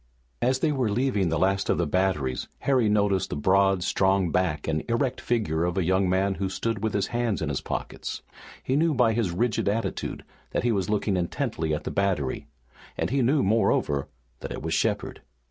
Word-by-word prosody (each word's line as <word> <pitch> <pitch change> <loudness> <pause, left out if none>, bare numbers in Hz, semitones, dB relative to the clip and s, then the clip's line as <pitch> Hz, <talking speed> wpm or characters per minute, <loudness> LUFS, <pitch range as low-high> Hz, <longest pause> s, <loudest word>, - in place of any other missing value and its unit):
As 130 +2 +1
they 155 - +2
were 130 -6 0
leaving 105 -5 +1
the 80 - 0
last 95 +3 +1
of - - +3
the 85 - +1
batteries 75 -6 0
Harry 130 -6 +2
noticed 100 -2 +2
the - - -3
broad, 95 +4 +3
strong 95 -2 +2
back 85 -4 0
and 80 -1 0
erect 120 +2 0
figure 105 -10 0
of 90 +1 -1
a 95 - +2
young 95 +2 +2
man 95 +2 +2
who 95 - 0
stood 110 +2 -2
with 110 -2 -1
his 100 - +1
hands 120 -3 0
in 75 - -2
his 70 - -2
pockets. - - -5 0.4
He 130 - 0
knew 160 +1 +2
by 115 -3 +3
his 110 -4 0
rigid 100 +4 0
attitude 105 -2 -3 0.3
that - - 0
he 120 - +2
was 95 -4 -1
looking 105 -2 +1
intently 90 - -2
at 75 +2 -1
the - - -4
battery 90 -9 -1 0.5
and - - -1
he 135 0 +2
knew, 135 +4 +3
moreover, 85 -9 +1 0.3
that - - -7
it - - -5
was - - -2
Shepard. - - -1
100 Hz, 200 wpm, -26 LUFS, 90-115 Hz, 0.5 s, of